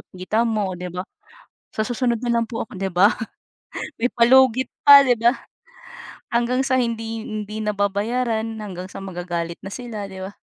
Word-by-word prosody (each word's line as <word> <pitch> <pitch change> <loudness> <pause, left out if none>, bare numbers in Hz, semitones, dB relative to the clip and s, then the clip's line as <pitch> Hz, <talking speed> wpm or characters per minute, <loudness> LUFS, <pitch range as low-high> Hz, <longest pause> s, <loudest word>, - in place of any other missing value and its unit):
tita 215 +6 0
mo, 210 -4 -1
o - - -5
'di 180 - -5
ba? 180 +1 -5 0.7
"Sa 215 - -2
susunod 240 -1 0
na 240 0 -1
lang 230 - +2
po 225 -1 -5
ako," - - -12
'di 190 0 -3
ba? 185 +5 +4 0.8
May 245 +1 -1
palugit 255 +1 +5 0.2
pa, 280 -1 +9
'di 245 - +4
ba? 240 +3 +4 0.9
Hanggang 240 +2 +1
sa 265 -1 +1
hindi 225 -2 -2
hindi 215 0 -5
nababayaran, 215 +3 -1 0.2
hanggang 185 -3 -6
sa 190 - -9
magagalit 175 -2 -4
na 195 - -6
sila, 230 -5 -6
'di 190 -1 -7
ba? 205 - -19
220 Hz, 170 wpm, -22 LUFS, 195-240 Hz, 0.9 s, pa